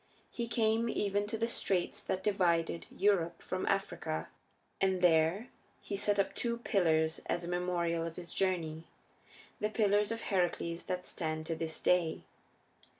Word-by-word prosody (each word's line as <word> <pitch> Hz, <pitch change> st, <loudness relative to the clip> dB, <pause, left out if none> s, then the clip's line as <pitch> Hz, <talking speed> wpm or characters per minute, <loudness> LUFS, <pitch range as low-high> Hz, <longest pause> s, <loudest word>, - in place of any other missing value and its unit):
He 235 Hz, -1 st, -3 dB
came 225 Hz, 0 st, +2 dB
even 205 Hz, -1 st, 0 dB
to 225 Hz, -, -3 dB
the 230 Hz, +1 st, 0 dB
straits 190 Hz, -6 st, 0 dB
that 185 Hz, -, -2 dB
divide 170 Hz, -5 st, +1 dB
Europe 180 Hz, -4 st, +1 dB
from -, -, -3 dB
Africa, 80 Hz, +1 st, -1 dB, 0.5 s
and 190 Hz, -1 st, +2 dB
there 175 Hz, +5 st, +3 dB, 0.3 s
he 200 Hz, -, -5 dB
set 205 Hz, +1 st, +2 dB
up 200 Hz, -, +1 dB
two 235 Hz, -1 st, -1 dB
pillars 160 Hz, -8 st, +2 dB
as 175 Hz, -, -1 dB
a -, -, -5 dB
memorial 175 Hz, -1 st, 0 dB
of 165 Hz, 0 st, -5 dB
his 175 Hz, -1 st, -8 dB
journey 165 Hz, -4 st, -1 dB, 0.7 s
the 210 Hz, -, 0 dB
Pillars 210 Hz, -1 st, +2 dB
of 230 Hz, 0 st, -3 dB
Heracles 175 Hz, -3 st, -1 dB
that 180 Hz, 0 st, -3 dB
stand 155 Hz, -1 st, -2 dB
to 165 Hz, 0 st, -2 dB
this 160 Hz, 0 st, -3 dB
day. 175 Hz, -3 st, +2 dB
180 Hz, 150 wpm, -33 LUFS, 165-205 Hz, 0.7 s, there